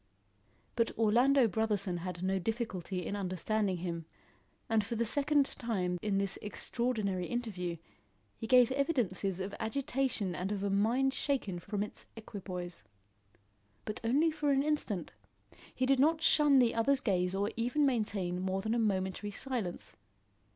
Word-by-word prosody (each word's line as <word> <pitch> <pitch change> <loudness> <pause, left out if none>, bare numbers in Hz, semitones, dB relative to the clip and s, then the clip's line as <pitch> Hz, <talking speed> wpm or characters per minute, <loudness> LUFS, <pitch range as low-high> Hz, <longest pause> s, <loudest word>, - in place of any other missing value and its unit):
But 230 -1 +2
Orlando 240 +4 +4
Brotherson 205 -5 0
had 180 0 -5
no 190 +1 +1
difficulty 190 -4 -3
in 200 - -3
understanding 195 +1 -1
him, 170 -2 -4 0.6
and 220 -2 +2
for 225 +3 -4
the 235 +1 0
second 285 +4 +3
time 185 -9 -2
in 205 -2 0
this 195 -1 -1
extraordinary 210 -4 -2
interview, 190 -8 -3 0.6
he 225 - -6
gave 250 0 +6
evidences 230 - 0
of 190 +1 -4
agitation 250 -5 -1
and 185 +3 -3
of 200 -1 -2
a 200 - 0
mind 240 +7 +2
shaken 255 -12 -1
from 200 +3 -2
its 210 - -9
equipoise. 185 -5 -7 1.0
But 215 - -4
only 285 +8 +3
for 300 -1 -1
an 275 0 +3
instant. 290 - -2 0.6
He 255 - +1
did 270 0 +3
not 315 +3 +3
shun 295 -2 +6
the 245 -3 +4
other's 260 +4 +3
gaze 185 -6 0
or 200 +2 0
even 245 +6 +1
maintain 205 -8 0
more 190 +1 -1
than 220 +1 0
a 235 - +1
momentary 195 -1 -1
silence. 215 -4 -4
215 Hz, 150 wpm, -32 LUFS, 190-255 Hz, 1.0 s, gave